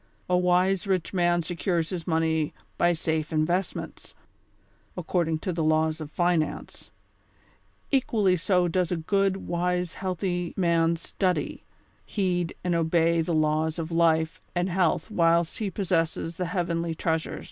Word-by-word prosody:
A 180 - +2
wise 180 +2 +2
rich 185 -2 0
man 175 -2 +2
secures 170 0 -1
his 175 -3 -5
money 160 -2 0 0.2
by 175 - +3
safe 160 -2 -1
investments, 170 +4 -2 0.8
according 170 -2 0
to 180 +3 -3
the 165 -1 -1
laws 155 0 +1
of 150 - -6
finance; 175 -2 -1 1.0
equally 220 -8 +2
so 180 +1 +2
does 180 0 0
a 175 - 0
good, 195 +3 +1
wise 180 0 -1
healthy 180 -2 -3
man 170 -2 +2
studv 180 +2 -2 0.4
heed 180 -4 -1
and 180 -1 0
obey 165 0 +2
the 165 0 -1
laws 155 +1 +1
of 165 0 -4
life 160 -1 +2
and 175 +2 0
health 180 +3 +1
whilst 170 -3 +2
he 210 -3 -1
possesses 165 -3 -1
the 180 - -1
heavenly 170 -2 -1
treasure. 160 -1 -2
170 Hz, 135 wpm, -26 LUFS, 160-180 Hz, 1.0 s, by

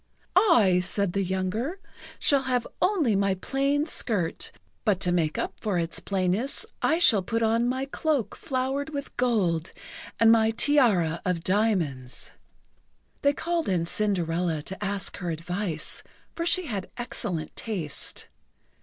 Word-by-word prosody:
"I," 210 - +5
said 185 +1 0
the 195 - +1
younger, 190 - -2 0.4
"shall 280 -2 +3
have 250 -3 0 0.2
only 325 - +3
my 195 -1 +2
plain 275 +8 0
skirt, 205 - -1 0.3
but 200 -4 +2
to 180 -2 +1
make 165 -3 +1
up - - -2
for 205 -4 0
its 170 -1 -2
plainness, 195 +7 -1 0.2
I 320 - +3
shall 235 - +5
put 225 +5 -1
on 230 +2 +2
my 260 +1 -1
cloak 280 -3 -1
flowered 270 +2 -2
with 285 -2 -6
gold, 190 -10 +1 0.5
and 225 0 +7
my 225 -1 +5
tiara 205 - +3
of 180 -3 -1
diamonds." 175 - 0 0.9
They 285 0 +4
called 335 -1 -1
in 175 -3 +1
Cinderella 175 -5 0
to 190 +5 -5
ask 200 -1 -2
her 180 -3 -4
advice, 165 0 -3 0.3
for 335 0 -2
she 365 +1 +3
had 200 -9 -4
excellent 180 -9 -1
taste. 180 -10 -4
205 Hz, 140 wpm, -27 LUFS, 180-260 Hz, 0.9 s, and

